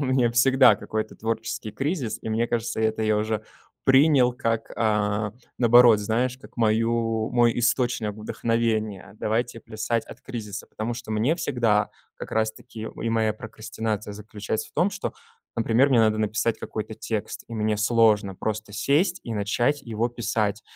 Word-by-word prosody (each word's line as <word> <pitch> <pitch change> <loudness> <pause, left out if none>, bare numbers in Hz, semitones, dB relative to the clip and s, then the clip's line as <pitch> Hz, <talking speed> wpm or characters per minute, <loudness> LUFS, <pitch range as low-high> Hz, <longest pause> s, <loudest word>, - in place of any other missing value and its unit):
у 140 - 0
меня 130 -2 +2
всегда 130 +2 +6
какой-то 110 0 -4
творческий 110 -1 -3
кризис, 135 - -2
и - - -5
мне 115 +2 +1
кажется, 115 -1 -2
это 110 0 +1
я 110 -1 +2
уже 110 0 -1 0.4
принял 135 -2 +5
как 115 -2 -2
а, 105 -1 +1 0.3
наоборот, 120 -2 +7
знаешь, 120 +5 -1
как - - -16
мою 115 0 +1
мой 120 -1 +3
источник 120 -3 +1
вдохновения. 110 -2 -1
Давайте 115 +2 -1
плясать 110 +2 -2
от - - -12
кризиса, 110 -5 -6
потому 115 +2 -4
что 120 -2 -8
мне 110 +8 +2
всегда, 115 - +1 0.2
как - - -9
раз 110 0 +1
таки, 110 -2 -9
у - - -9
и 115 - -1
моя 110 -1 +1
прокрастинация 110 -1 -5
заключается 105 +1 -5
в - - -25
том, 175 +6 +2
что, - - -4 0.4
например, 115 +4 +3
мне 130 -4 +4
надо 110 -1 +3
написать 110 +1 0
какой-то 110 0 -5
текст, 110 -1 -4
и 115 - -7
мне 110 -1 0
сложно 105 -3 +3
просто 110 0 -4
сесть 170 - +1
и 115 - -4
начать 120 +7 0
его 115 -1 -1
писать. 110 -3 -1
115 Hz, 160 wpm, -25 LUFS, 110-120 Hz, 0.4 s, наоборот